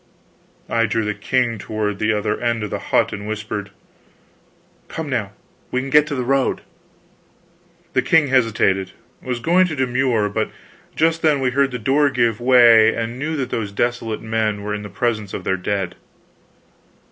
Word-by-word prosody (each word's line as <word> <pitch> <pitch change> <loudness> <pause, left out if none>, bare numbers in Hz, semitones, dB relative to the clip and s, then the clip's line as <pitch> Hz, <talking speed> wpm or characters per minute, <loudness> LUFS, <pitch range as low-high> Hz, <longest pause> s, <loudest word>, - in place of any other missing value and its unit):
I 115 -1 +1
drew 110 -1 -1
the 105 - -1
king 120 -1 -1
toward 105 -1 -3
the 110 0 +1
other 105 0 -1
end 120 -2 0
of 105 - -5
the - - -2
hut - - +2
and 105 0 -6
whispered: 105 -1 -4 1.2
"Come 160 -1 -5
now 115 -8 -2 0.4
we 125 - -1
can 135 +1 -5
get 150 +1 +5
to 145 - -3
the 130 - -2
road." 135 +1 +1 1.3
The - - +3
king 150 -4 +3
hesitated, 105 -7 +1 0.3
was 125 -2 -3
going 180 +7 +3
to 160 - -4
demur; 125 -4 +1
but 110 +2 -2 0.5
just 165 +1 +2
then 150 -3 +3
we 130 -1 0
heard 140 +1 +2
the 125 - -4
door 140 +5 +2
give 120 -4 +1
way, 120 -3 +6
and 115 +2 -4
knew 155 +3 -2
that 130 -4 -3
those 105 -3 -2
desolate 115 0 -2
men 110 -2 -1
were 105 0 -3
in 105 - -4
the 105 - -8
presence 110 0 -2
of - - -6
their 95 - 0
dead. 95 -1 -2
115 Hz, 175 wpm, -20 LUFS, 105-130 Hz, 1.3 s, way